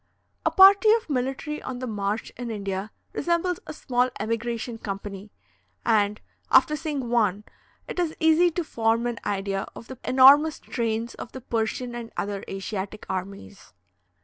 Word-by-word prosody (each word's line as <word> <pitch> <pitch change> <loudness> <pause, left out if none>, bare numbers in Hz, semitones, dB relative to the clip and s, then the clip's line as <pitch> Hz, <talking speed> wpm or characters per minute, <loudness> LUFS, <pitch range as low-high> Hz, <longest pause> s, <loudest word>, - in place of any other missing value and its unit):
A - - +3
party 395 +2 +7
of 445 -9 -1
military 270 +4 -2
on 255 - -5
the 255 - -4
march 210 -1 -3
in 245 -1 -5
India 200 -2 -3 0.2
resembles 345 +1 0
a - - -5
small 250 -4 0
emigration 230 +1 -3
company; 200 0 -6 0.6
and, 210 -2 +2 0.3
after 260 +3 +5
seeing 295 -5 -3
one, 210 -4 +2 0.4
it - - -5
is 335 -3 0
easy 320 +2 +5
to 345 +1 -2
form 230 -4 0
an 240 -2 -2
idea 195 -1 -2
of 230 - -11
the 260 -1 -9
enormous 280 +4 +6
trains 230 0 -2
of 235 - -9
the 260 - -7
Persian 235 +1 -2
and 235 -1 -7
other 200 -1 -3
Asiatic 195 +1 -5
armies. 185 - -7
235 Hz, 150 wpm, -25 LUFS, 205-280 Hz, 0.6 s, party